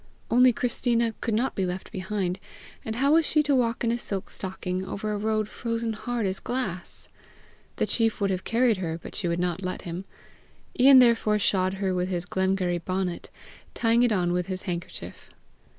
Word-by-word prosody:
Only 250 +2 +6
Christina 235 -1 0
could 225 - 0
not 245 +4 0
be 195 - -1
left 180 +1 -4
behind, 185 -1 -2 0.4
and 220 - -4
how 275 +4 +2
was 325 +1 +5
she 305 0 +2
to 290 -1 +1
walk 240 -3 +1
in 230 - +2
a 235 - -1
silk 195 -5 -4
stocking 185 -1 -3
over 210 +3 -4
a - - -1
road 215 0 0
frozen 230 0 -3
hard 235 0 -3
as 190 0 0
glass? 210 -9 -5 0.7
The - - 0
chief 225 -2 +1
would 200 -1 +1
have 185 0 -2
carried 235 -1 +2
her, 165 -3 -3
but - - -10
she 180 - -1
would 170 0 0
not 175 0 -1
let 185 -1 -4
him. 175 +2 -5 0.7
Ian 265 +2 +8
therefore 230 -4 +5
shod 190 -2 +1
her 190 -1 -1
with 180 0 -1
his 175 -2 -2
Glengarry 190 -1 0
bonnet, 185 0 -3 0.5
tying 230 0 +3
it 245 -1 +3
on 175 -4 +1
with 180 -1 -1
his 185 -1 -4
handkerchief. 175 -2 -6
200 Hz, 190 wpm, -26 LUFS, 185-235 Hz, 0.7 s, Ian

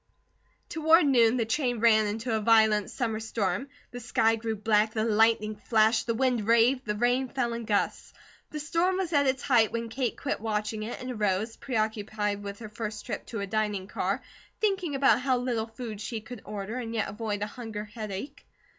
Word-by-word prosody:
Toward 320 0 +4
noon 240 -3 +4
the 230 - +1
train 245 0 0
ran 220 -2 +5
into 225 +3 -3
a - - +1
violent 220 -2 +4
summer 225 -4 -2
storm. 220 +1 -2 0.2
The 245 - -7
sky 225 -1 +2
grew 225 0 -3
black, 215 +1 +2
the 215 - +1
lightning 220 -1 +3
flashed, 220 +1 +2
the 230 - 0
wind 245 -4 +1
raved, 235 +3 +4
the 210 -1 -1
rain 245 +4 +1
fell 240 -3 -1
in 230 0 -5
gusts. 205 -1 -1 0.4
The 305 - -5
storm 335 +5 +1
was 360 -3 -2
at 285 -2 +4
its 260 -1 0
height 230 -5 +4
when 230 0 -3
Kate 245 0 -2
quit - - -2
watching 215 0 -2
it 220 +3 -5
and 255 0 -5
arose, 215 0 -1
preoccupied 215 -3 -2
with 200 0 -6
her 220 -1 -9
first 215 -1 -6
trip - - -5
to 225 -4 -4
a - - -2
dining 210 -2 -1
car, - - -2 0.4
thinking 385 -8 0
about 270 -1 +4
how 260 -1 +2
little 240 -3 -1
food 225 -2 -7
she 225 +1 -4
could 220 0 -10
order 210 +3 -5
and 230 -2 -4
yet 215 - 0
avoid 210 0 -3
a - - 0
hunger 220 -2 -6
headache. 215 +5 -7
225 Hz, 195 wpm, -28 LUFS, 215-250 Hz, 0.4 s, ran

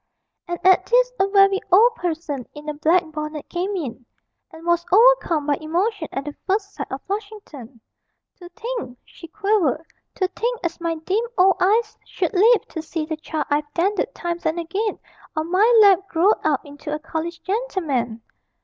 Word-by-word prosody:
And 345 0 -3
at 375 0 +5
this - - +3
a 385 - +3
very 390 -1 +4
old 450 +7 +6
person 320 - -4
in 295 +1 -10
a 300 - -2
black 320 +4 +3
bonnet 305 -1 -6
came 375 +4 -2
in, 260 -8 -5 0.5
and 325 -2 -13
was 345 0 +2
overcome 420 -8 +4
by 290 -1 +1
emotion 350 +3 -1
at 275 - -4
the 295 - -6
first 400 +1 -1
sight 275 - -6
of 265 +1 -5
Flushington. 395 - -7 0.6
'To 350 -2 -12
think,' 445 - -6
she 335 - -13
quavered, 390 -5 0 0.3
'to 375 - +1
think 475 +4 -2
as 340 0 -3
my 335 -1 -1
dim 375 +8 -1
old 380 0 +5
eyes 430 +4 +1
should - - -3
live 430 +4 +4
to 320 - -5
see 320 0 -4
the 315 0 -3
child 315 0 -4
I've 295 0 0
dandled 390 +4 0
times 345 -1 -3
and 320 +2 -1
again 390 +6 -2 0.4
on 315 +2 -3
my 415 +6 +4
lap 390 -1 +5
growed 365 +5 +2
out 300 -2 0
into 290 +1 -8
a 300 - -1
college 325 +2 -5
gentleman!' 315 - -2
345 Hz, 175 wpm, -22 LUFS, 310-400 Hz, 0.6 s, old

